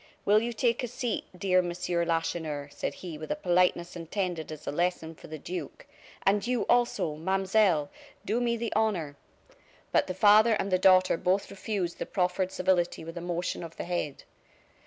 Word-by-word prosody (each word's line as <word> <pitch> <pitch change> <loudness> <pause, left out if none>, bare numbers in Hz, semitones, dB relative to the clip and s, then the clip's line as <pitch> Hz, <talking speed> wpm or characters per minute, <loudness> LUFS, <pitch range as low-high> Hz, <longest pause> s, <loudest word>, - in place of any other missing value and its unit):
"Will 210 +1 +5
you 235 +1 -2
take 235 +1 +1
a - - -1
seat, 245 0 -3
dear 185 -1 +3
Monsieur 175 0 -1
Lacheneur?" 160 -3 -2
said - - -4
he, 160 -4 -6
with 155 - -7
a - - 0
politeness 180 -1 +1
intended 170 -1 -3
as 155 -1 -9
a - - -2
lesson 170 0 -1
for - - -14
the 155 - -7
duke; 180 +5 -7 0.4
"and 205 +3 +2
you, 250 -2 +1
also, 235 -9 +1
Mademoiselle, 190 -1 +2 0.4
do 225 +5 0
me 235 -1 +1
the 230 0 -3
honor 190 -10 0 0.4
" - - -31
But - - +3
the 185 - -4
father 215 +3 +6
and 200 -2 -1
the 185 - +3
daughter 185 -2 +5
both 185 +4 0
refused 195 -3 -3
the - - -3
proffered 180 0 0
civility 180 -2 +1
with 165 +1 -8
a 170 - -5
motion 175 0 -3
of 165 -1 -9
the - - -5
head. 170 -5 -3
180 Hz, 185 wpm, -28 LUFS, 170-205 Hz, 0.4 s, father